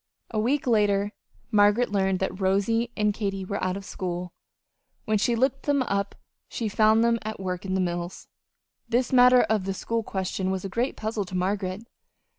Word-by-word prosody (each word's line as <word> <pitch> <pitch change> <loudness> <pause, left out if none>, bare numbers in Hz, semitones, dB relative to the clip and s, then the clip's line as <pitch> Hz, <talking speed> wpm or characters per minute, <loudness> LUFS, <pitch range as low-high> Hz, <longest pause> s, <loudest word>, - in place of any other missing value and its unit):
A 220 - -1
week 260 +6 +1
later 205 -3 +2 0.4
Margaret 210 +2 +4
learned 195 -2 +1
that 190 0 -2
Rosy 200 +5 +1
and 210 -1 +2
Katy 195 -2 -3
were 200 +2 -3
out 185 +1 0
of 200 - -9
school. 180 -2 -5 0.7
When 215 -1 +1
she 235 +3 +2
looked 265 +3 0
them 285 -2 +3
up 200 -4 -2 0.3
she 230 - -3
found 220 +2 +4
them 235 0 +2
at 215 -1 -6
work 185 -1 -4
in 190 0 -1
the 190 - +1
mills. 175 0 -4 0.6
This 245 +2 +1
matter 250 0 +7
of 215 -3 0
the 195 0 -2
school 230 +4 -2
question 190 -2 -3
was 190 0 -2
a - - -3
great 235 +7 -1
puzzle 215 -2 -2
to 185 - -7
Margaret. 190 +2 -1
205 Hz, 185 wpm, -26 LUFS, 190-230 Hz, 0.7 s, matter